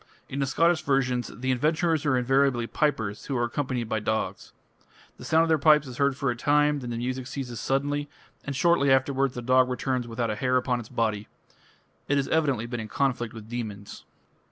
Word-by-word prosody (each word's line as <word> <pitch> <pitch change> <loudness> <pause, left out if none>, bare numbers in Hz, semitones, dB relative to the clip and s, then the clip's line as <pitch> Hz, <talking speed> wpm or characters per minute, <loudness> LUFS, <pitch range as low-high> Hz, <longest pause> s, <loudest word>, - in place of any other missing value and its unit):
In 140 - -5
the 140 - 0
Scottish 165 +3 +2
versions 130 -3 0
the 130 +2 -2
adventurers 155 +4 +1
are 130 -3 +3
invariably 130 -1 +2
pipers 110 -7 -1
who 135 - -2
are 120 - +1
accompanied 125 -1 -2
by 110 0 -1
dogs. 110 +1 -3 0.7
The - - -11
sound 160 +1 +3
of 165 - -1
the 160 -1 +3
pipes 150 0 +5
is 125 -2 -9
heard 140 -1 +2
for 140 -3 0
a - - -3
time; 145 +3 +2
then 125 -3 -6
the 120 - -3
music 125 +1 -3
ceases 125 -3 -5
suddenly, 145 +2 -1 0.3
and 145 - -4
shortly 160 -1 +3
afterwards 135 0 +2
the 120 - -5
dog 130 +1 +4
returns 125 -1 -2
without 115 -1 -2
a - - -2
hair 130 +3 +1
upon 125 -1 0
its 115 - -9
body. 110 -2 -1 0.8
It 145 - +2
has 140 - 0
evidently 140 -8 +1
been 120 0 -5
in 110 - -5
conflict 125 -1 -1
with 110 -1 -10
demons. 110 -4 -6
130 Hz, 205 wpm, -26 LUFS, 120-140 Hz, 0.8 s, pipes